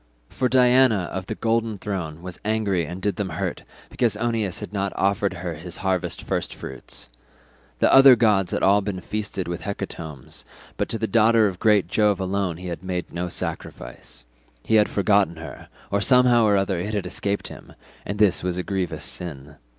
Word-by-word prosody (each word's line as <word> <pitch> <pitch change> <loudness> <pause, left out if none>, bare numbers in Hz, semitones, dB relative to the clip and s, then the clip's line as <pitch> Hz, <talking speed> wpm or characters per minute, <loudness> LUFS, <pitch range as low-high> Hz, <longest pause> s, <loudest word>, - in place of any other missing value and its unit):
For 130 -1 -1
Diana 125 -6 +4
of 95 -1 -4
the - - -3
golden 115 -1 0
throne 90 -5 -5
was 90 -1 -7
angry 100 -6 0
and 90 +3 -7
did 105 +1 0
them 100 -3 -2
hurt 90 +2 -3 0.3
because 115 -4 0
Oeneus 110 -4 -1
had - - -8
not 100 -1 -2
offered 100 0 0
her 85 0 -4
his 80 +2 -6
harvest 95 -2 -1
first - - -3
fruits. 65 -2 -6 0.7
The - - +3
other 135 -1 +9
gods 105 -5 +2
had - - -1
all 100 +2 +5
been 95 -2 -4
feasted 100 -1 -4
with 85 0 -4
hecatombs, 85 -9 -6 0.3
but - - -2
to 115 - -2
the 110 - -1
daughter 115 0 +4
of 95 -3 -2
great 105 -3 +3
Jove 105 -3 +2
alone 95 -2 -1
he 90 +1 -7
had 85 - -5
made 90 -2 -4
no 90 +1 -2
sacrifice. - - -6 0.4
He - - -2
had 105 -1 +5
forgotten 100 -4 +2
her, 80 -5 -10 0.2
or 100 0 +1
somehow 125 -1 +5
or 105 -1 +4
other 95 -2 0
it 105 +5 -3
had 100 - -2
escaped 100 0 -2
him, - - -12 0.3
and 100 - -4
this 105 -3 +3
was 90 -1 -2
a 90 - -2
grievous 95 -1 -3
sin. 75 -4 -5
100 Hz, 190 wpm, -23 LUFS, 90-110 Hz, 0.7 s, other